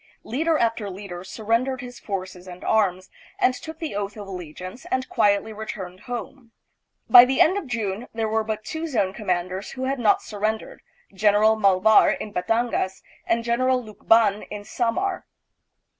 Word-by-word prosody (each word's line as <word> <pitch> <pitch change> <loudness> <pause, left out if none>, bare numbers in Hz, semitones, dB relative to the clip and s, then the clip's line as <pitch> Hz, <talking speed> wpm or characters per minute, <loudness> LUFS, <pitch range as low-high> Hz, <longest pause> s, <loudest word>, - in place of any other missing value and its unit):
Leader 315 +7 0
after 230 -4 0
leader 185 -2 -8
surrendered 230 +6 -1
his 245 -1 -9
forces 185 -2 -6
and 180 0 -10
arms, 185 -4 +1 0.3
and 255 - +3
took 320 +5 -8
the 320 -6 -5
oath 205 +1 -4
of 205 -1 -8
alle 190 -2 -6
giance 185 +9 -9
and 260 0 -1
quietly 210 0 +1
returned 190 -4 -7
home. 245 +1 -7 0.5
By 245 -1 +10
the 260 +2 0
end 365 - +5
of 400 -8 -3
June 225 -1 -3
there 225 -1 -2
were 220 0 0
but 215 0 -4
two 320 +1 -4
zone 200 -10 0
commanders 185 -2 -3
who 260 - -5
had 270 0 -1
not 215 -4 +3
sur 210 - -8
rendered, 220 +1 -2 0.3
General 210 +2 +4
Malvar 200 0 +5
in 210 - -7
Batangas, 215 -1 -1 0.2
and 230 0 +1
General 255 +2 +2
Lukban 215 -2 +2
in 210 -1 -6
Samar. 265 - -2
220 Hz, 165 wpm, -24 LUFS, 200-245 Hz, 0.5 s, By